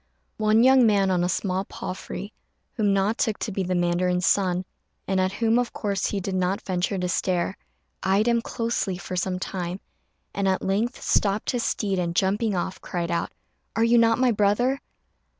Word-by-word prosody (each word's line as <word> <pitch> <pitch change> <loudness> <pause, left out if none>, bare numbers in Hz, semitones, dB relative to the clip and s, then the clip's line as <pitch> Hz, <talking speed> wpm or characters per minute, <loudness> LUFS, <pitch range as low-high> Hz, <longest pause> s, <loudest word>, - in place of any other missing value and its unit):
One 215 +1 +4
young 260 -2 +6
man 200 -3 +3
on 180 -1 +2
a 180 - 0
small 185 0 -1
palfrey, 195 +1 -7 0.4
whom 210 -4 +1
Na 195 +2 +2
took 225 -3 -1
to 220 - -4
be 195 - -2
the 185 0 -1
mandarin's 180 +1 +1
son, 185 -2 +2 0.4
and 190 -1 +1
at 185 +1 0
whom, 230 +2 +2
of 245 - -2
course, 200 -2 -1
he 200 - -2
did 195 +1 -4
not 185 +1 0
venture 185 +1 -1
to 180 -1 -1
stare, 180 -1 0 0.5
eyed 195 +4 +2
him 235 -1 +3
closely 230 -6 -2
for 185 0 -6
some 180 +1 -1
time, 180 0 -4 0.5
and 200 -1 0
at 190 0 +1
length 215 +7 0
stopped 205 +1 +1
his 245 -2 -1
steed, 195 -3 -1
and, 170 -1 -2
jumping 205 +3 +1
off, 180 +1 -3
cried 170 -2 -3
out, 170 - -1 0.4
"Are 225 - +2
you 235 +1 +5
not 230 0 +4
my 255 -1 +3
brother?" 225 +6 +2
195 Hz, 185 wpm, -25 LUFS, 185-220 Hz, 0.5 s, young